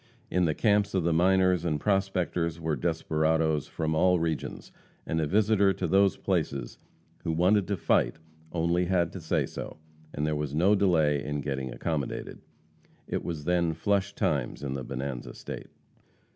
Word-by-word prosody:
In 90 -1 +2
the 80 -2 0
camps 105 -2 +2
of 95 - +2
the 85 0 +2
miners 90 0 +3
and 75 -4 0
prospectors 90 -3 0
were 80 -2 -1
desperadoes 80 -2 0
from 80 -1 -2
all 90 +2 +3
regions, 80 -2 -3 0.3
and 80 0 -1
a 75 - 0
visitor 100 +1 +3
to 95 -1 -3
these 95 +3 +3
places 80 -7 -2 0.4
who 80 - -1
wanted 90 +4 +3
to 100 - -1
fight - - +2 0.4
only 85 +1 +1
had 85 -2 +1
to 95 - -7
say 80 - 0
so, - - -7 0.3
and 75 - -2
there 75 0 0
was 75 -1 -3
no 90 +6 +4
delay 80 -8 +3
in 75 0 -3
getting 65 -2 -3
accommodated. 75 -2 -4 0.7
It - - -2
was 80 -3 -4
then 85 -2 +1
flush 100 +4 0
times - - -1
in 70 -2 -2
the 70 -1 -4
Bonanza 65 -1 -5
State. - - -7
85 Hz, 165 wpm, -28 LUFS, 75-95 Hz, 0.7 s, no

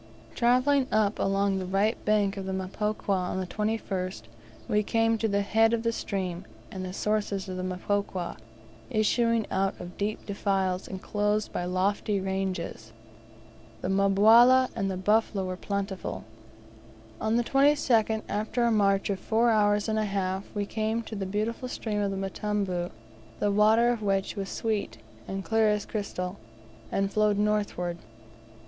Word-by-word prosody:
Travelling 255 +3 +3
up 215 -1 +2
along 195 0 +1
the 185 - -4
right 200 +4 +1
bank 205 -2 +2
of 195 -1 -5
the - - -2
Mpokwa, 205 +3 -3
on 185 0 -2
the 185 - -2
21st 195 - -3 0.4
we 210 - +2
came 225 +1 +2
to 225 - +1
the 200 -1 +1
head 225 +3 +3
of 230 -1 0
the 230 - +1
stream, 185 -5 -3 0.3
and 185 - -5
the 185 - -5
sources 205 -1 -1
of 185 - -5
the 185 - -3
Mpokwa, 185 0 -2 0.5
issuing 230 0 +2
out 195 0 0
of 175 0 -9
deep 210 +1 -2
defiles 195 -2 -1
enclosed 210 +2 -1
by 175 - -2
lofty 195 +3 0
ranges. 190 -12 -3 0.9
The - - -2
mbawala 220 +7 +6
and 195 - -1
the 190 - -3
buffalo 205 0 +1
were 185 0 -3
plentiful. 195 0 -4 1.0
On 220 +1 +1
the 240 - +3
22nd, 245 -5 +3
after 215 +4 -1
a 235 - +3
march 200 -2 +2
of 195 - -2
four 230 +4 +2
hours 205 -1 +3
and 220 0 0
a 215 - +1
half, 195 -1 -2
we 205 -1 -1
came 220 +2 -1
to 220 - -7
the 195 -2 -3
beautiful 220 +6 -2
stream 220 -4 -3
of 200 -1 0
Mtambu 195 -2 -2 0.5
the 205 - +1
water 220 +4 +4
of 235 -2 -2
which 195 -2 0
was 195 -2 -4
sweet, 205 - -2 0.3
and 195 0 -4
clear 220 -1 +3
as 210 -1 0
crystal, 195 -3 -4 0.5
and 195 0 0
flowed 210 -1 +3
northward. 205 -5 0
205 Hz, 155 wpm, -28 LUFS, 190-220 Hz, 1.0 s, mbawala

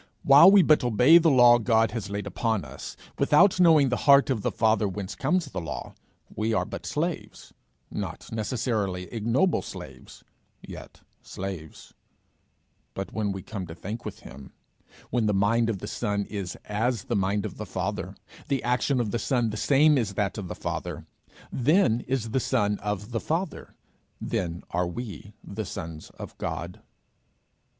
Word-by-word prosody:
While 140 +6 +8
we 195 -1 +7
but 155 -4 +4
obey 125 +8 +6
the 165 -1 +3
law 120 -3 +6
God 115 -1 +2
has 110 -4 -5
laid 100 0 -4
upon 110 +1 -1
us, - - -9 0.2
without 180 +5 +4
knowing 160 -6 +6
the 125 - 0
heart 140 0 +7
of 115 -5 -1
the - - 0
Father 110 -2 +2
whence 95 0 -5
comes 170 +5 0
the 135 -10 -6
law, 75 -5 -6 0.4
we 110 +1 0
are - - +1
but - - -7
slaves - - -4 0.4
not - - -6
necessarily 110 -5 -2
ignoble 120 - +1
slaves, - - -11 0.4
yet - - -11 0.2
slaves; 90 -5 -8 1.0
but 95 - -5
when 105 -2 -1
we 95 -1 -6
come 100 -5 -6
to 80 - -9
think 105 +7 -6
with - - -8
him, 65 0 -12 0.6
when 120 -3 +1
the 105 - +1
mind 115 +4 +2
of 110 - -1
the 105 - -7
son 105 -2 -2
is 100 -4 -5
as 115 +2 -1
the 135 - -2
mind 100 +1 0
of 105 - -6
the - - -5
Father, - - -4 0.3
the 135 -3 -1
action 125 +2 +1
of 115 -4 -1
the 120 - -1
son 120 -4 0
the - - -5
same 145 +6 +4
as 105 -5 -3
that 100 -1 -1
of 95 - -6
the 90 - -6
Father, - - -5 0.5
then 130 - +3
is 125 -4 -2
the 130 - +1
son 105 -6 0
of 105 +2 -4
the 115 - -1
Father, 170 +9 -4 0.4
then 85 -1 -3
are 90 +1 0
we 105 +1 -7
the 110 +2 -5
sons 80 -4 -7
of - - -9
God. 85 +2 -5
110 Hz, 170 wpm, -26 LUFS, 100-130 Hz, 1.0 s, While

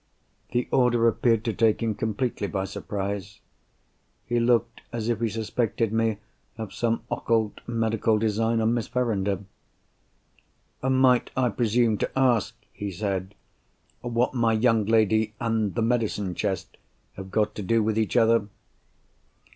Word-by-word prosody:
The 120 0 0
order 120 -2 +3
appeared 115 0 +2
to 115 - 0
take 115 +1 +2
him 110 -1 0
completely 110 0 -2
by 95 0 -2
surprise. 100 0 -5 0.9
He 120 0 0
looked 120 0 +1
as 115 -1 -3
if 115 - 0
he 115 -1 0
suspected 115 0 -1
me 110 -1 +1 0.4
of 110 -4 -6
some 115 -1 -1
occult 110 -3 0
medical 115 -1 +1
design 115 +1 +1
on 110 +1 +2
Miss 120 -2 -1
Verinder! 100 -6 -1 1.4
"Might 130 -1 +3
I 125 -2 +3
presume 115 0 +1
to - - 0
ask," 120 -4 +2 0.2
he 105 - -5
said, 95 0 -3 0.7
"what 120 +1 0
my 115 -3 +2
young 110 -2 +2
lady 110 -1 +2
and 110 -3 0
the 115 - +1
medicine 110 -5 0
chest 95 0 -3 0.4
have 95 0 -9
got 105 +2 0
to 105 - -6
do 110 +3 +2
with 110 0 0
each 110 +2 0
other?" 115 -2 +4
115 Hz, 140 wpm, -26 LUFS, 105-115 Hz, 1.4 s, other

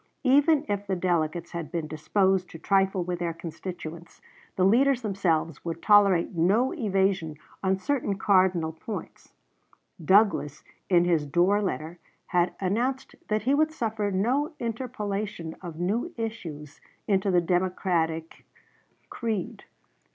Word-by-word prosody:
Even 290 +3 +4
if 205 0 -2
the 190 - 0
delegates 170 -2 -1
had 170 -2 -5
been 170 -3 -2
disposed 185 +4 +1
to - - -9
trifle 195 +1 +1
with 175 0 -3
their 170 -2 -2
constituents, 170 0 -8 0.4
the 185 - +2
leaders 250 +5 +3
themselves 170 -7 -1
would 165 -1 -4
tolerate 200 -4 +4
no 200 +10 +2
evasion 195 - 0 0.3
on 190 0 +2
certain 220 -2 -1
cardinal 185 -5 +3
points. 185 +2 -8 0.7
Douglas, 190 -5 +3 0.3
in 175 -2 +4
his 165 -4 +1
Dorr 180 +7 +3
letter, 170 -3 -4 0.3
had 175 -1 +1
announced 240 +8 -1
that 215 0 0
he 265 +4 +2
would 310 +2 +3
suffer 220 -8 -2
no 250 - 0
interpolation 210 -7 -4
of 170 -3 -8
new 225 - -1
issues 165 -11 -6 0.3
into 195 -1 +2
the 180 -2 +4
Democratic 170 -2 -1 0.7
creed. 220 -6 -4
190 Hz, 130 wpm, -27 LUFS, 170-215 Hz, 0.7 s, Even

